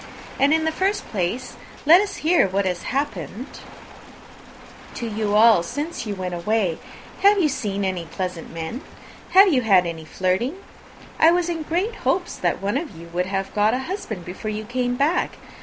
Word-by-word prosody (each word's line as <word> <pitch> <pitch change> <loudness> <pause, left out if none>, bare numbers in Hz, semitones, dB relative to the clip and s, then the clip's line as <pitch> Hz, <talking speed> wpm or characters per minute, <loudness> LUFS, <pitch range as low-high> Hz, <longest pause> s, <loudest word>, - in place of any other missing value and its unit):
And 275 +1 +4
in 320 0 +2
the 320 - +1
first 385 +5 -1
place, 215 +6 -3 0.3
let 335 +5 +8
us 415 - -3
hear 335 - +4
what 195 +1 0
has 180 -1 -2
happened 255 - -4 1.4
to 235 - -4
you 210 -1 -1
all 220 -3 +6
since 290 - -4
you 205 - -3
went 185 -1 -4
away. 185 -1 0 0.4
Have 405 +1 +6
you 335 - +4
seen 200 -8 -2
any 185 -3 -2
pleasant 180 0 -5
men? 165 - -5 0.5
Have 380 -1 +7
you 255 - +3
had 195 -6 +4
any 165 -1 -5
flirting? 185 - -1 0.6
I 320 - +7
was 350 0 +2
in 330 -2 -2
great 355 +9 -2
hopes - - -1
that - - -1
one 205 +6 0
of 305 - -5
you 170 0 -11
would 180 +2 -1
have 195 0 -3
got 215 +3 +3
a 265 +1 -3
husband 235 - -5
before 190 +5 -6
you 215 0 -4
came 245 +1 -1
back. 290 +7 0
220 Hz, 180 wpm, -23 LUFS, 185-305 Hz, 1.4 s, let